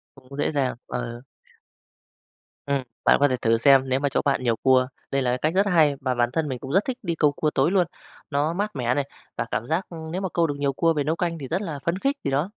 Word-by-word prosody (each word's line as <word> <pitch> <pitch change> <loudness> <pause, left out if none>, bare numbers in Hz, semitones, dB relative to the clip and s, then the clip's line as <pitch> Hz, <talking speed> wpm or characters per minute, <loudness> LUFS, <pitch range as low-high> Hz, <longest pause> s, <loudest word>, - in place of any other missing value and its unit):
Cũng 135 +1 -13
dễ 145 - 0
dàng, 135 -3 0
ờ. 120 -1 -5 1.4
Ừm, 140 -2 0 0.2
bạn - - +6
có 145 - +5
thể 130 - 0
thử 115 -1 +2
xem 135 +1 +5
nếu 130 +1 +1
mà 145 - +1
chỗ 140 - 0
bạn 135 -2 +1
nhiều 115 -2 +1
cua. 130 -1 +4 0.2
Đây 135 0 +1
là 125 - +1
cái 125 - 0
cách 155 +6 0
rất 195 +2 +3
hay, 155 -4 +4
mà 130 -2 0
bản 120 0 +1
thân 155 -1 0
mình 130 -2 -3
cũng 135 - -7
rất 195 +5 +3
thích 255 -1 -3
đi 170 -3 -1
câu 150 -2 +3
cua 155 - 0
tối 140 +3 +2
luôn, 185 -4 +3 0.4
nó 145 +3 +1
mát 205 +1 -3
mẻ 125 -1 +1
này, 145 0 0 0.3
và - - -2
cảm 115 - -2
giác 160 +6 -1 0.3
nếu 185 - -2
mà 190 - -2
câu 170 -1 +3
được 145 - -3
nhiều 140 -1 +1
cua 165 +4 +2
về 145 -3 -1
nấu 160 +3 0
canh 170 -1 -2
thì 135 -4 -7
rất 185 +5 -1
là 155 -7 -4
phấn 170 +3 0
khích, 275 +6 0
thì 140 - 0
đó. 145 +8 0
145 Hz, 270 wpm, -24 LUFS, 130-165 Hz, 1.4 s, bạn